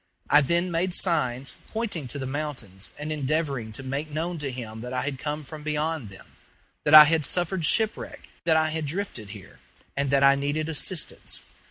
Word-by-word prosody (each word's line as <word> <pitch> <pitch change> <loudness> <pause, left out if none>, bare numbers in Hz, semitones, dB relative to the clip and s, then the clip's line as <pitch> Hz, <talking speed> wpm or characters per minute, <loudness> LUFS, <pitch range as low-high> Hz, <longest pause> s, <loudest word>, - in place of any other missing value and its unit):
I 145 - +8
then 170 +5 +1
made 175 +2 0
signs, 135 -7 +1
pointing 210 - -2
to 135 - -4
the 135 - -4
mountains 130 -9 -5
and 150 +1 -5
endeavoring 140 -5 -1
to 135 - -7
make 140 +4 -3
known 165 +3 -3
to 145 -2 -3
him 115 -3 -7
that 125 +1 -6
I 130 - -1
had 135 -1 -3
come 150 +2 -3
from 150 +2 -9
beyond 155 -4 -2
them 95 - -13 0.6
that 150 - +7
I 155 - +14
had 160 +1 +2
suffered 175 +2 -1
shipwreck, 220 +6 0 0.2
that 160 -2 +4
I 155 0 +2
had 160 -1 -2
drifted 150 - -4
here, 100 -1 -12 0.4
and 140 0 0
that 140 0 +3
I 140 0 +8
needed 145 +3 -1
assistance. 160 +2 -1
150 Hz, 190 wpm, -26 LUFS, 130-160 Hz, 0.6 s, I